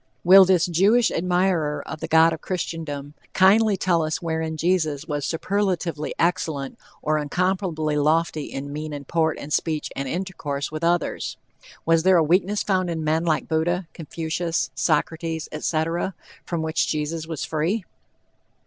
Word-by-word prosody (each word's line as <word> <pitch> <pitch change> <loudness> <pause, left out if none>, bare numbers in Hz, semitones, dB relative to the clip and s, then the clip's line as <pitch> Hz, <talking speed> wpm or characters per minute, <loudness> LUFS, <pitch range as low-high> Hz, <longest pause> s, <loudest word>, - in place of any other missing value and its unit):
Will 190 +2 +9
this 185 -3 +3
Jewish 200 +8 +3
admirer 175 -4 0
of 155 +2 -6
the - - -4
god 160 +1 +5
of 160 - -7
Christendom 160 -5 -4 0.2
kindly 200 +2 +5
tell 175 -3 +2
us 155 0 -1
wherein 160 -2 -3
Jesus 160 -4 0
was 145 -2 -2
superlatively 175 -4 -1
excellent, 160 -5 -1 0.2
or 155 0 +1
incomparably 165 0 -1
lofty 155 0 +1
in 140 +1 -6
mien 155 0 -5
and 145 -1 -7
port 160 -2 +1
and 145 +1 -6
speech 155 -2 -1
and 135 0 -3
intercourse 150 -4 -4
with 155 +1 -5
others? 175 +1 0 0.5
Was 165 0 +4
there 185 +1 +5
a 165 - +4
weakness 185 +6 +2
found 185 -3 0
in 160 -2 -3
men 160 +2 +1
like 160 -2 0
Buddha, 170 +3 0
Confucius, 165 -2 -3
Socrates, 160 +2 -1
etc., 165 +3 -1 0.3
from 170 -2 -2
which 160 +1 0
Jesus 155 +1 -2
was 160 -3 -4
free? 170 +7 -1
165 Hz, 150 wpm, -23 LUFS, 155-180 Hz, 0.5 s, Will